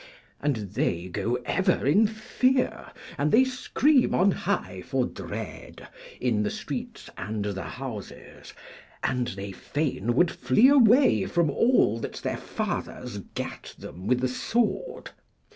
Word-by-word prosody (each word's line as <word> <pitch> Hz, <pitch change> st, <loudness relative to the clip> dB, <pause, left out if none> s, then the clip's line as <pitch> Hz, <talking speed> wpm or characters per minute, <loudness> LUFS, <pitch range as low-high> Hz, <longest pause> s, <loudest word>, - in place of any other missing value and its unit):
And 145 Hz, -2 st, +1 dB, 0.2 s
they 85 Hz, -1 st, -1 dB
go 115 Hz, +7 st, -1 dB
ever 185 Hz, -6 st, +1 dB
in 205 Hz, +11 st, +5 dB
fear, 250 Hz, +4 st, 0 dB, 0.3 s
and 150 Hz, +1 st, +2 dB
they 250 Hz, -, +6 dB
scream 260 Hz, +2 st, +2 dB
on 195 Hz, +2 st, +4 dB
high -, -, -2 dB
for -, -, 0 dB
dread -, -, -8 dB, 0.3 s
in 115 Hz, -4 st, +1 dB
the 105 Hz, -, 0 dB
streets -, -, -6 dB
and 105 Hz, 0 st, -3 dB
the 100 Hz, -2 st, -3 dB
houses, 125 Hz, -7 st, -8 dB, 0.5 s
and 125 Hz, -2 st, 0 dB
they 100 Hz, +1 st, -5 dB
fain 120 Hz, 0 st, -2 dB
would 175 Hz, +4 st, +4 dB
flee 130 Hz, -, +4 dB
away 260 Hz, -1 st, +5 dB
from 170 Hz, -4 st, +1 dB
all 140 Hz, -, +3 dB
that -, -, -5 dB
their -, -, -3 dB
fathers 125 Hz, -5 st, -4 dB, 0.2 s
gat -, -, -6 dB
them 90 Hz, +4 st, -9 dB
with 125 Hz, 0 st, +2 dB
the 130 Hz, -, +2 dB
sword. 235 Hz, -, -1 dB
140 Hz, 135 wpm, -26 LUFS, -, 0.5 s, they